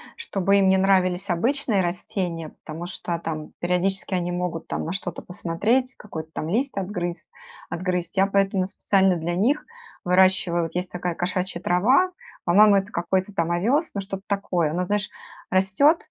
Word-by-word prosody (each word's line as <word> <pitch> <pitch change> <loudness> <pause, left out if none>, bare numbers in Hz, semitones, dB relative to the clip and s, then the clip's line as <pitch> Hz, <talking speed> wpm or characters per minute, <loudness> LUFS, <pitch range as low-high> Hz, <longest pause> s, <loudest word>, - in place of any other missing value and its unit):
чтобы 200 - +1
им 195 -1 +4
не 190 0 +5
нравились 190 0 +2
обычные 230 +3 +1
растения, 175 -2 -3
потому 160 +2 -6
что 175 -1 -4
там 155 -2 -5
периодически 180 +2 0
они 175 -1 0
могут 175 -2 -3
там - - -3
на 165 - -3
что-то 190 -2 -5
посмотреть, 215 +10 0
какой-то 160 -6 -7
там 155 - -3
лист 250 +5 0
отгрыз 180 -3 -3 0.4
отгрызть. 180 -1 -2
Я 195 0 +4
поэтому 195 -1 +1
специально 195 -1 +2
для 170 +1 -2
них 245 +11 +1 0.4
выращиваю 180 -1 +3
вот 165 - -8
есть 180 0 -2
такая 180 -1 -3
кошачья 180 0 -2
трава, 250 - +3 0.3
по-моему 205 +4 +6
это 195 +1 0
какой-то 185 +3 -1
там 170 -3 0
овёс, 245 - +1
ну 200 - -1
что-то 195 0 -6
такое. 185 -5 0
Оно, 175 +4 -1
знаешь, 205 +2 -1 0.4
растет 195 - +4
185 Hz, 160 wpm, -24 LUFS, 175-200 Hz, 0.4 s, по-моему